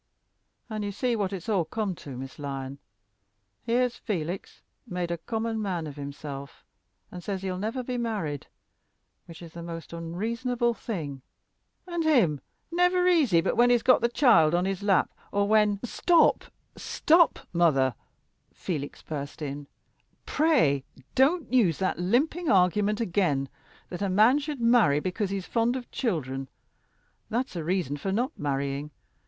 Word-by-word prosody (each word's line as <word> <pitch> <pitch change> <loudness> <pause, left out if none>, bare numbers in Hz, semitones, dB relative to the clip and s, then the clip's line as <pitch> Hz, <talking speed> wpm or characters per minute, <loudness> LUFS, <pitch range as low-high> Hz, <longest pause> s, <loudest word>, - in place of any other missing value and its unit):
And 215 -2 -4
you 205 - -2
see 240 +4 0
what 200 -3 -1
it's 190 0 -6
all 200 -6 +2
come 205 +4 -2
to, 135 -4 -8
Miss 135 +3 -8
Lyon: 135 -1 -5 0.8
here's 245 +1 0
Felix 180 -3 -4 0.2
made 180 -1 -3
a 170 - -1
common 225 +4 -2
man 180 -5 -2
of 145 -2 -7
himself, 140 -1 -8 0.5
and 180 -1 -8
says 195 -2 -4
he'll 185 -1 -3
never 225 +5 -2
be 245 0 -3
married 200 - -3 0.8
which 165 0 -11
is 165 -1 -11
the 170 - -7
most 165 0 -7
unreasonable 230 +9 -1
thing, 155 - -5 0.6
and 345 -2 -2
him 225 - +3 0.3
never 360 +1 +3
easy 280 - +4
but 180 - -1
when 240 +1 +5
he's 240 -2 +3
got 255 -1 +5
the 235 - +2
child 175 - +5
on 175 +1 +1
his 195 0 -2
lap, 200 -2 +2 0.2
or 200 0 +1
when 210 -1 +3
" - - -40
"Stop, 335 +7 +3 0.3
stop, 330 +1 +3 0.2
mother," 140 -7 +3 0.6
Felix 150 -6 -5
burst 145 -2 -6
in; 145 -1 -5 0.6
"pray 250 - +2 0.3
don't 285 +3 +2
use 205 -11 +4
that 185 -2 -1
limping 280 - +1
argument 200 +3 +3
again 170 - 0 0.4
that 175 - -6
a 200 - 0
man 220 +9 +5
should 295 -3 -5
marry 230 -12 +4
because 185 +4 -2
he's 195 -2 -3
fond 235 +1 +1
of 250 -2 -6
children. 135 - -2 0.8
That's 240 -1 -2
a 170 - -3
reason 170 -4 -1
for 190 +7 -3
not 240 +6 0
marrying. 140 0 -2
195 Hz, 155 wpm, -27 LUFS, 160-235 Hz, 0.8 s, when